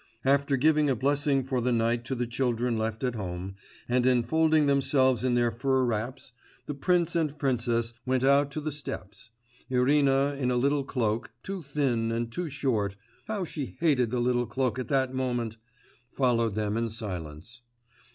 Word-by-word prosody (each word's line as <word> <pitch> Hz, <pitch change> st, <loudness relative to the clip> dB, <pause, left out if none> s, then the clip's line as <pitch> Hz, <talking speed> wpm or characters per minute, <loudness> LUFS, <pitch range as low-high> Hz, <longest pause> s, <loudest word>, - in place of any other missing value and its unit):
After 140 Hz, 0 st, +3 dB
giving 150 Hz, +2 st, +3 dB
a 130 Hz, -, +2 dB
blessing 140 Hz, +2 st, +1 dB
for 130 Hz, -1 st, -1 dB
the 125 Hz, +1 st, +1 dB
night 115 Hz, 0 st, +1 dB
to 130 Hz, -, -2 dB
the 120 Hz, 0 st, -1 dB
children 120 Hz, -1 st, 0 dB
left 110 Hz, +2 st, -2 dB
at 125 Hz, -2 st, 0 dB
home, 95 Hz, -3 st, -5 dB, 0.3 s
and 125 Hz, 0 st, +2 dB
enfolding 155 Hz, +5 st, +3 dB
themselves 135 Hz, -3 st, +2 dB
in 125 Hz, -1 st, +2 dB
their 120 Hz, -1 st, +2 dB
fur 130 Hz, +2 st, +1 dB
wraps, 120 Hz, +3 st, -3 dB, 0.3 s
the 145 Hz, -, -4 dB
prince 175 Hz, +3 st, +1 dB
and 155 Hz, -3 st, 0 dB
princess 120 Hz, -4 st, 0 dB
went 130 Hz, +1 st, 0 dB
out 140 Hz, +1 st, +4 dB
to 155 Hz, -, -3 dB
the 155 Hz, +1 st, -3 dB
steps; 105 Hz, -8 st, -6 dB, 0.4 s
Irina 135 Hz, +2 st, +3 dB
in 125 Hz, -2 st, 0 dB
a 125 Hz, -, +1 dB
little 140 Hz, +3 st, +2 dB
cloak, 115 Hz, -4 st, -1 dB
too 195 Hz, -1 st, -4 dB
thin 135 Hz, -6 st, 0 dB
and 115 Hz, 0 st, -2 dB
too 175 Hz, +5 st, -3 dB
short 115 Hz, -8 st, -1 dB, 0.3 s
how 210 Hz, -4 st, -2 dB
she 145 Hz, -5 st, -6 dB
hated 140 Hz, -8 st, +2 dB
the 125 Hz, +1 st, -1 dB
little 120 Hz, 0 st, +1 dB
cloak 130 Hz, +2 st, -1 dB
at 130 Hz, -, -4 dB
that 130 Hz, -2 st, +1 dB
moment! 120 Hz, -4 st, -2 dB, 0.5 s
followed 115 Hz, -5 st, +1 dB
them 105 Hz, 0 st, -1 dB
in 115 Hz, 0 st, -1 dB
silence. 100 Hz, 0 st, -6 dB
125 Hz, 170 wpm, -28 LUFS, 115-140 Hz, 0.5 s, out